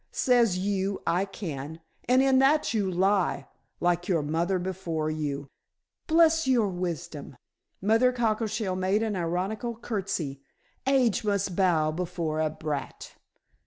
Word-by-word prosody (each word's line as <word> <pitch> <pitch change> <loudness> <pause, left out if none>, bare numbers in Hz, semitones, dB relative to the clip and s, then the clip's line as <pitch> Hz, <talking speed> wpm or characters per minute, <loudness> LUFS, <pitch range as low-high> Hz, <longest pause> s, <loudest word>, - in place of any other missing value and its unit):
Says 240 -7 +3
you, 195 +1 -1
'I 175 +3 +1
can!' 160 -6 -6 0.3
And 255 +1 +5
in 265 -1 +4
that 280 0 +3
you 205 -4 0
lie, 185 -5 +1 0.3
like 175 0 +1
your 165 -5 +1
mother 170 +5 0
before 175 -4 -3
you. 145 -2 -3 0.6
Bless 325 -2 +4
your 235 -6 +3
wisdom" 165 -7 -5 0.5
Mother 225 +5 +4
Cockleshell 220 -4 -1
made 190 +4 +1
an 215 -2 -1
ironical 190 +7 -2
curtsey. 195 - -3 0.5
"Age 255 -6 +3
must 200 -3 0
bow 170 -5 +2
before 165 -2 -3
a 155 0 +1
brat." 150 -3 -5
190 Hz, 125 wpm, -27 LUFS, 165-220 Hz, 0.6 s, And